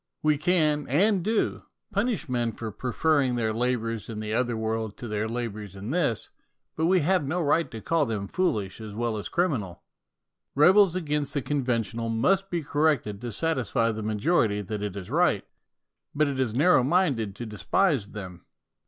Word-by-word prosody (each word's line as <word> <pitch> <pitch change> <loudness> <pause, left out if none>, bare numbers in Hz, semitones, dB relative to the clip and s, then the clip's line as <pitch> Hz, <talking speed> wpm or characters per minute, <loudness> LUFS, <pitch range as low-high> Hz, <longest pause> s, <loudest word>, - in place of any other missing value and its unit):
We 155 0 +4
can, 150 -2 +1
and 190 - +3
do, 220 +3 0 0.3
punish 205 -3 -1
men 120 -3 -1
for 115 -2 -6
preferring 130 +3 +1
their 110 -2 0
labours 115 -2 -1
in 110 -2 -5
the 110 0 -4
other 120 0 0
world 110 -1 -2
to 120 - -7
their 105 0 -2
labours 110 -4 -5
in 100 +5 -6
this; 145 -10 0 0.4
but 160 +1 +1
we 185 0 +4
have 180 +2 +2
no 170 +5 -1
right 165 +1 +2
to 110 - -8
call 165 0 +1
them 105 -3 -3
foolish 105 - -1
as 105 -2 -8
well 115 0 -1
as 105 - -5
criminal. 130 - -1 0.7
Rebels 185 +5 +6
against 150 -4 -2
the 140 - 0
conventional 120 -5 -1
must 190 +13 +1
be 170 -2 -2
corrected 145 -9 0
to 120 -1 -4
satisfy 125 -4 0
the 110 0 -5
majority 105 0 +1
that 105 +2 -5
it 105 -2 -4
is 95 -3 -7
right; - - +2 0.7
but 150 +1 +3
it 140 -2 -3
is 120 -4 0
narrow 155 +2 +5
minded 130 - +1
to 120 - -6
despise 110 - 0
them. 90 -4 -9
125 Hz, 175 wpm, -26 LUFS, 110-160 Hz, 0.7 s, Rebels